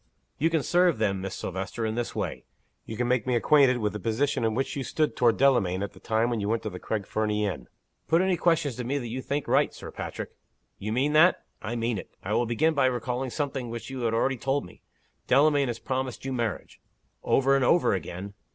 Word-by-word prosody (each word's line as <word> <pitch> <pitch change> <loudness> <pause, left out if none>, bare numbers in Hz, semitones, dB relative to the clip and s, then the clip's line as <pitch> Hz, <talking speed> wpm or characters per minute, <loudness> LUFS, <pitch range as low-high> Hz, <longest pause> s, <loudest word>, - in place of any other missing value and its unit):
"You 160 +4 +3
can 160 -3 +1
serve 175 -2 +3
them, 100 -3 0
Miss 95 0 -4
Silvester, 95 +5 -4
in 110 - -1
this 120 +1 -3
way. - - -3 0.4
You 110 - -6
can 120 +1 0
make 125 -1 +1
me 125 - +2
acquainted 130 +1 +4
with 105 -3 -1
the 105 - -4
position 115 +6 0
in 110 -1 +1
which 135 +2 -1
you 140 - -2
stood 155 +3 0
toward 120 -2 +3
Delamayn 105 -9 +3
at 100 - -5
the - - -15
time 115 +1 0
when 115 - -1
you 100 0 -2
went 115 0 0
to 110 - -3
the 90 - -7
Craig 105 -3 -3
Fernie 105 -1 0
inn." 100 - -4 0.4
"Put 165 +3 +3
any 190 -1 +2
questions 165 -6 +1
to 125 - -3
me 135 +4 -1
that 120 -4 -4
you 130 +3 -4
think 140 +2 -3
right, - - +3
Sir - - -9
Patrick." - - -6 0.5
"You 105 +2 -4
mean 135 +6 +1
that?" 165 +4 +5 0.2
"I 110 +2 -4
mean 115 -2 -1
it." - - -10
"I 105 - -2
will 120 +1 +2
begin 155 +8 +2
by 130 - +3
recalling 125 +1 -2
something 135 -3 -3
which 120 +3 -6
you 130 - -5
have 115 -2 0
already 135 +3 +1
told 135 +4 -1
me. 90 - -15 0.5
Delamayn 145 +1 +4
has 120 -2 -3
promised 130 0 -3
you 135 - -2
marriage 115 -8 -3 0.2
" - - -44
"Over 135 +1 +3
and 135 - +2
over 170 +2 +4
again!" 95 +1 -5
120 Hz, 235 wpm, -27 LUFS, 110-140 Hz, 0.5 s, that